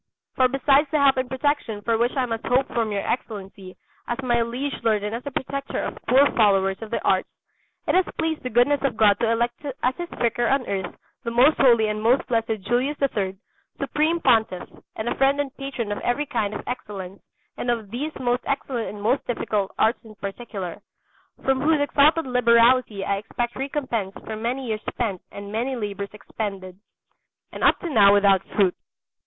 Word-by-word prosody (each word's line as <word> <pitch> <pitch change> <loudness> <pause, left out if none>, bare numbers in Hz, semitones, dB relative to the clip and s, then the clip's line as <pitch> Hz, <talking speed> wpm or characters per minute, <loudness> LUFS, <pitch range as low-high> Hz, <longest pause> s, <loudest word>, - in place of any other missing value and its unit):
For 255 - +4
besides 275 +3 +3
the 305 - +1
help 280 -2 +4
and 255 -1 -1
protection 265 -6 -1
for 230 +1 +1
which 235 +2 +1
I 260 - +2
must 225 -2 -4
hope 255 +2 +2
from 225 -2 -1
your 200 -1 -2
Excellency, 195 -5 -5 0.3
as 240 - -2
my 240 -2 +2
liege 250 +4 -3
lord 215 -3 +1
and 210 +1 -3
as 230 - -3
the 285 - -5
protector 275 +1 -4
of - - -4
poor 270 +3 +6
followers 195 -3 +3
of 220 - -7
the 235 - -1
arts, - - +2 0.6
it - - +1
has 370 0 +4
pleased 320 -1 -1
the 255 - -4
goodness 245 +5 +3
of 265 -6 -1
God 205 -2 +4
to 230 - +1
elect 235 +3 -1 0.2
as 255 +1 +2
His 345 -1 -5
Vicar 240 0 +1
on 270 -2 +1
earth 190 -3 -3 0.3
the 235 - -2
most 250 +6 +4
holy 235 -4 +5
and 210 0 -2
most 240 +5 +3
blessed 225 -3 -1
Julius 250 +8 0
III, 200 -8 -1 0.4
Supreme 320 +3 0
Pontiff 220 - +2 0.3
and 220 - -4
a - - +1
friend 275 +1 +2
and 280 -2 -2
patron 270 -6 -4
of 205 - -2
every 280 +5 0
kind 215 -6 -2
of - - -6
excellence 200 -6 -6 0.4
and 245 - -3
of 225 -4 -2
these 285 +7 -3
most 245 0 0
excellent 265 -4 -2
and 210 - -8
most 245 +6 +1
difficult 210 -4 -1
arts 225 +4 +2
in 220 -2 -13
particular, 195 -3 -6 0.6
from 265 0 +2
whose 310 +1 +3
exalted 295 +3 +3
liberality 235 -4 +3
I 200 - 0
expect 240 +4 -4
recompense 260 -8 -3
for 220 - -5
many 240 +5 -3
years 215 -1 -2
spent 195 -5 -3
and 200 0 -8
many 240 +5 -1
labours 200 -3 -4
expended, 195 -3 -6 0.7
and - - -6
up - - +5
to 345 - -4
now 200 -5 +6
without 200 -2 +4
fruit. 190 -4 +3
235 Hz, 195 wpm, -24 LUFS, 210-265 Hz, 0.7 s, poor